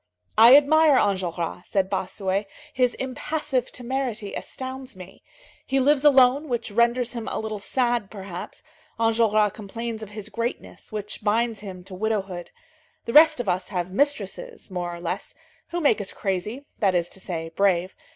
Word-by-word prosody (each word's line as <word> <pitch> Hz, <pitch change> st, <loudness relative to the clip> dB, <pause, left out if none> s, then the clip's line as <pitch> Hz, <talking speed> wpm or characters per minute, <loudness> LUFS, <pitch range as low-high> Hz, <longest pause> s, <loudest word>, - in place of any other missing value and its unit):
"I 230 Hz, +4 st, +9 dB
admire 300 Hz, 0 st, +5 dB
Enjolras," 180 Hz, -4 st, -1 dB
said 195 Hz, -2 st, +1 dB
Bossuet. 190 Hz, +1 st, -2 dB, 0.3 s
"His 250 Hz, -1 st, +2 dB
impassive 265 Hz, 0 st, -2 dB
temerity 245 Hz, -4 st, -3 dB
astounds 260 Hz, -2 st, -6 dB
me. 185 Hz, 0 st, -12 dB, 0.5 s
He 270 Hz, 0 st, +2 dB
lives 280 Hz, +1 st, +3 dB
alone, 275 Hz, +1 st, +5 dB
which 235 Hz, -3 st, -2 dB
renders 235 Hz, +2 st, +2 dB
him 230 Hz, -2 st, -5 dB
a -, -, -2 dB
little 215 Hz, -1 st, -4 dB
sad, 240 Hz, -1 st, 0 dB
perhaps; 190 Hz, -4 st, -8 dB, 0.4 s
Enjolras 220 Hz, -2 st, +3 dB
complains 225 Hz, +2 st, -6 dB
of 215 Hz, -, -7 dB
his 210 Hz, -1 st, -8 dB
greatness, 235 Hz, +1 st, -5 dB
which 210 Hz, 0 st, -6 dB
binds 225 Hz, +1 st, +1 dB
him 190 Hz, -3 st, -8 dB
to 190 Hz, -, -11 dB
widowhood. 195 Hz, -3 st, -2 dB, 0.6 s
The 230 Hz, -, -4 dB
rest 310 Hz, -3 st, +7 dB
of 245 Hz, -, -3 dB
us 185 Hz, 0 st, 0 dB
have 180 Hz, -2 st, -3 dB
mistresses, 285 Hz, -, -2 dB
more 175 Hz, -1 st, -3 dB
or 170 Hz, -, -7 dB
less, 175 Hz, +2 st, -4 dB, 0.3 s
who 345 Hz, -, -3 dB
make 285 Hz, -8 st, +3 dB
us 195 Hz, -, -5 dB
crazy, 210 Hz, +8 st, -3 dB
that 195 Hz, -3 st, +2 dB
is 170 Hz, -1 st, +1 dB
to -, -, -10 dB
say, 165 Hz, -3 st, -5 dB
brave. 185 Hz, -2 st, +2 dB
215 Hz, 160 wpm, -24 LUFS, 190-255 Hz, 0.6 s, I